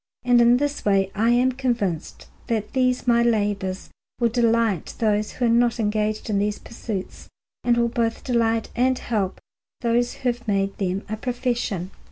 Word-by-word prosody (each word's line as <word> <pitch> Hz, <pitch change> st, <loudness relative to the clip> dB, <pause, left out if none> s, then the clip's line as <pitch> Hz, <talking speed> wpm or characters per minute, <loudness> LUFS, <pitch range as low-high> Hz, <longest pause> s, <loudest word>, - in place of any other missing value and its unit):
And 245 Hz, -1 st, +5 dB
in 240 Hz, +1 st, +6 dB
this 290 Hz, +1 st, -2 dB
way 195 Hz, -1 st, +2 dB
I 225 Hz, +3 st, +2 dB
am 245 Hz, +2 st, +4 dB
convinced 235 Hz, -, -2 dB, 0.2 s
that 220 Hz, -3 st, -2 dB
these 255 Hz, -1 st, +1 dB
my 235 Hz, -1 st, +4 dB
labours 205 Hz, -5 st, 0 dB, 0.3 s
will 235 Hz, -1 st, +3 dB
delight 230 Hz, -5 st, +1 dB
those 215 Hz, -1 st, 0 dB
who 250 Hz, -, -1 dB
are -, -, +3 dB
not 235 Hz, 0 st, +3 dB
engaged 215 Hz, 0 st, -1 dB
in 205 Hz, -3 st, +1 dB
these 205 Hz, 0 st, 0 dB
pursuits, 215 Hz, -4 st, -7 dB, 0.3 s
and 240 Hz, -1 st, +3 dB
will 235 Hz, 0 st, +3 dB
both 230 Hz, -1 st, -1 dB
delight 230 Hz, -3 st, 0 dB
and 255 Hz, +2 st, +2 dB
help 205 Hz, -5 st, -2 dB, 0.4 s
those 240 Hz, 0 st, +1 dB
who 255 Hz, -, -1 dB
have 240 Hz, 0 st, -12 dB
made 195 Hz, -1 st, 0 dB
them 190 Hz, 0 st, -1 dB
a 215 Hz, -, -4 dB
profession. 240 Hz, -6 st, -2 dB
230 Hz, 170 wpm, -23 LUFS, 205-240 Hz, 0.4 s, in